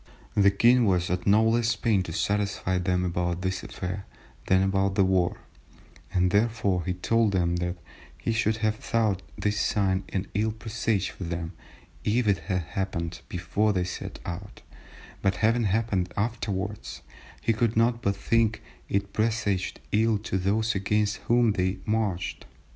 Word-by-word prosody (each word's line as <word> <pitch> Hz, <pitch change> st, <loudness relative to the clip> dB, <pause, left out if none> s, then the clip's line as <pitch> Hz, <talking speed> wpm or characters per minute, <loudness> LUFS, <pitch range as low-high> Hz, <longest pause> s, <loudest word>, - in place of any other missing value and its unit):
The 100 Hz, -2 st, +5 dB
king 120 Hz, +5 st, +4 dB
was 90 Hz, -3 st, +1 dB
at 90 Hz, +1 st, -2 dB
no 105 Hz, +2 st, +6 dB
less 115 Hz, 0 st, +2 dB
pain 105 Hz, -2 st, +2 dB
to 90 Hz, -, -5 dB
satisfy 100 Hz, 0 st, 0 dB
them 90 Hz, 0 st, 0 dB
about 90 Hz, 0 st, -1 dB
this 95 Hz, 0 st, -1 dB
affair 95 Hz, +1 st, -5 dB, 0.4 s
than 95 Hz, 0 st, +4 dB
about 95 Hz, 0 st, +1 dB
the 100 Hz, -, +4 dB
war, 95 Hz, -2 st, +2 dB, 0.7 s
and 90 Hz, 0 st, +2 dB
therefore 100 Hz, -4 st, +1 dB
he 90 Hz, 0 st, -1 dB
told 110 Hz, +3 st, +2 dB
them 85 Hz, -2 st, +1 dB
that 90 Hz, 0 st, -2 dB, 0.4 s
he -, -, -2 dB
should 110 Hz, -1 st, +1 dB
have 110 Hz, 0 st, +1 dB
thought 110 Hz, -6 st, 0 dB, 0.2 s
this 105 Hz, 0 st, 0 dB
sign 95 Hz, -2 st, +1 dB
an 95 Hz, 0 st, -2 dB
ill 110 Hz, +2 st, +1 dB
presage 110 Hz, -2 st, -1 dB
for 95 Hz, -, -7 dB
them, 85 Hz, 0 st, -4 dB, 0.5 s
if 115 Hz, +2 st, +1 dB
it 100 Hz, -4 st, +3 dB
had 90 Hz, +2 st, -2 dB
happened 85 Hz, 0 st, -3 dB
before 105 Hz, +5 st, 0 dB
they 90 Hz, -2 st, +1 dB
set 90 Hz, -, -5 dB
out, 95 Hz, +4 st, -7 dB, 0.6 s
but 95 Hz, -1 st, +2 dB
having 115 Hz, +1 st, +3 dB
happened 100 Hz, -3 st, 0 dB
afterwards 105 Hz, -2 st, -3 dB, 0.4 s
he 115 Hz, -, +1 dB
could 110 Hz, 0 st, 0 dB
not 115 Hz, +1 st, +3 dB
but 100 Hz, -2 st, +1 dB
think 110 Hz, +2 st, +1 dB, 0.3 s
it 100 Hz, 0 st, -1 dB
presaged 110 Hz, -4 st, 0 dB
ill 110 Hz, +1 st, +3 dB
to 100 Hz, -2 st, -2 dB
those 110 Hz, +5 st, +1 dB
against 105 Hz, +1 st, +1 dB
whom 120 Hz, -1 st, +4 dB
they 95 Hz, -1 st, 0 dB
marched. 105 Hz, -5 st, -1 dB
100 Hz, 160 wpm, -27 LUFS, 90-110 Hz, 0.7 s, no